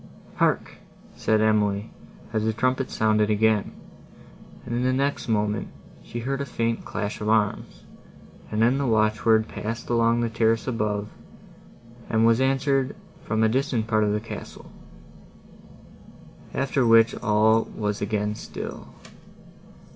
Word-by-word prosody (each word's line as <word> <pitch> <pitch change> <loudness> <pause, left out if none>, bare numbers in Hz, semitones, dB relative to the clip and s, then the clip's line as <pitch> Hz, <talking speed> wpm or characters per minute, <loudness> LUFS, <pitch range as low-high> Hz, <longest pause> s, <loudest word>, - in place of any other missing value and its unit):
"Hark!" - - 0 0.4
said 110 -1 +1
Emily, 105 -1 +1 0.4
as 110 -1 0
the 110 0 0
trumpet 130 +3 0
sounded 110 -1 +2
again; 110 0 +2 0.9
and, - - -5
in 120 - 0
the 130 +1 +2
next 140 +2 -1
moment, 105 -2 0 0.3
she 120 - -7
heard 135 +3 -2
a - - 0
faint 115 -2 -2
clash 105 +1 -4
of 105 - -1
arms, 110 -2 0 0.7
and 110 +1 +1
then 125 +4 +3
the 140 - 0
watchword 110 0 +2
passed 115 +3 -5
along 115 0 +3
the 120 - +1
terrace 115 0 +1
above, 105 -4 -2 1.0
and 110 0 +3
was 115 +2 +4
answered 135 0 +1 0.3
from 110 +1 0
a - - +5
distant 125 -1 0
part 110 -1 +1
of 105 - +1
the 105 - 0
castle; 115 - -9 1.8
after 135 -1 +1
which 115 -1 +5
all 110 +1 +3
was 105 -1 -2
again 105 0 -1
still. - - -8
110 Hz, 135 wpm, -25 LUFS, 105-120 Hz, 1.8 s, a